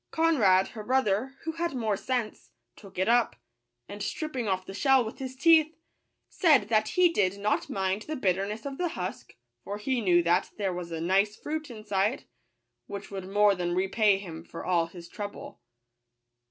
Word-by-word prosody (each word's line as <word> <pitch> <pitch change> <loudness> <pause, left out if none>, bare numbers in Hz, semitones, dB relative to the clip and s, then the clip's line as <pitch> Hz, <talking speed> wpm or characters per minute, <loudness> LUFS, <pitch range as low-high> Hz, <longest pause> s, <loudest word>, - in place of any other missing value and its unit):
Conrad, 225 - +3
her 215 -3 -8
bro 260 +3 +2
ther, 220 +6 -1
who 325 - -2
had 335 -2 -3
more 220 -4 0
sense, 235 +1 -3 0.3
took 195 -3 -15
it 190 +2 +1
up; 235 0 +3 0.5
and 205 +1 -8
stripping 265 -2 -3
off 185 -1 -1
the 195 - -8
shell 265 +3 +3
with 220 - -8
his 260 -1 -6
teeth, 315 +2 +4 0.5
said 285 - +3
that 215 -1 +3
he 360 -1 +6
did 195 - +1
not 205 +1 -1
mind 195 +1 -1
the 310 +7 -5
bitterness 200 -1 -1
of 275 -1 -6
the 355 -1 0
husk, 185 +2 -6 0.3
for 205 - -5
he 245 +3 -1
knew 175 -4 +4
that 175 +2 +2
there 195 -3 -1
was 175 -1 -6
a 165 - -3
nice 195 +4 +2
fruit 310 +3 -5
inside, 215 +1 -1 0.6
which 200 0 -7
would 190 -1 -6
more 205 0 +4
than 175 -2 -2
repay 195 +2 +3
him 165 -5 -8
for 165 - -9
all 170 -2 +2
his 170 0 -11
trouble. 205 - -8
210 Hz, 180 wpm, -28 LUFS, 190-260 Hz, 0.6 s, he